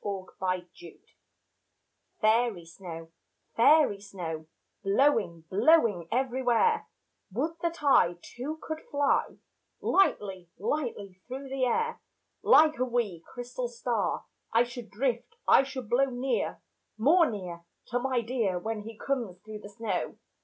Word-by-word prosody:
Snow 195 -2 -4
Song 185 - -4 1.3
Fairy 220 -5 +2
snow, 165 -1 -9 0.4
fairy 270 -4 +5
snow, 165 -6 -6 0.4
Blowing, 195 - +2
blowing 205 - +4
everywhere, 260 - +2 0.4
Would 270 - -1
that 335 -2 -2
I 180 -11 +5
Too, 280 +6 -6
could 315 0 -4
fly 285 -1 +1 0.4
Lightly, 195 - +1
lightly 205 - -3
through 265 +2 -6
the 265 -1 0
air. 460 - 0 0.4
Like 310 -3 +6
a - - +3
wee, 230 -9 -1
crystal 245 - -4
star 480 0 -2 0.3
I 230 +1 +5
should 240 -2 -8
drift, 245 - -2
I - - +8
should 265 -3 -6
blow 250 +5 +4
Near, 260 0 -2 0.4
more 315 +9 +5
near, 180 -6 -6 0.3
To 245 0 0
my 255 -1 0
dear 225 -6 0
Where 220 +3 -3
he 220 +1 -9
comes 235 -10 -2
through 215 -1 -7
the 205 - -10
snow. 205 -3 -3
235 Hz, 125 wpm, -29 LUFS, 195-275 Hz, 1.3 s, I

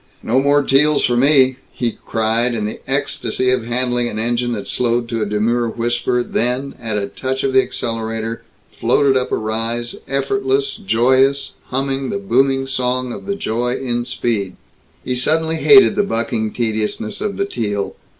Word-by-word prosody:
"No 125 +4 +2
more 145 +1 +3
Teals 145 +2 +3
for 120 - +1
me," 130 0 +4
he 120 -2 -3
cried, 115 +2 +1
in 105 -2 -2
the 105 - -5
ecstasy 130 0 0
of 125 -3 0
handling 120 0 0
an 110 - -5
engine 120 +2 -1
that 105 -3 -5
slowed 120 -1 0
to 115 -2 -2
a 105 - 0
demure 115 +3 0
whisper, 120 +1 0
then, 125 +4 -1
at 110 -3 -2
a 100 - -1
touch 130 +1 -3
of 135 - 0
the 130 - +6
accelerator, 115 -1 -4 0.3
floated 140 -2 +2
up 130 -1 0
a - - +2
rise, 115 +2 -2
effortless, 135 0 0
joyous, 130 +6 +2
humming 135 0 -2
the - - -2
booming 135 +6 +1
song 125 -1 -1
of 195 - -9
the 200 - -1
joy 125 - -1
in 120 -3 -2
speed. 105 -7 -2 0.5
He 125 - -1
suddenly 160 +6 +1
hated 400 - +6
the 205 - +3
bucking 115 - -1
tediousness 110 -2 -2
of 200 -2 -2
the 200 - 0
Teal. 105 - -3
125 Hz, 170 wpm, -18 LUFS, 115-135 Hz, 0.5 s, the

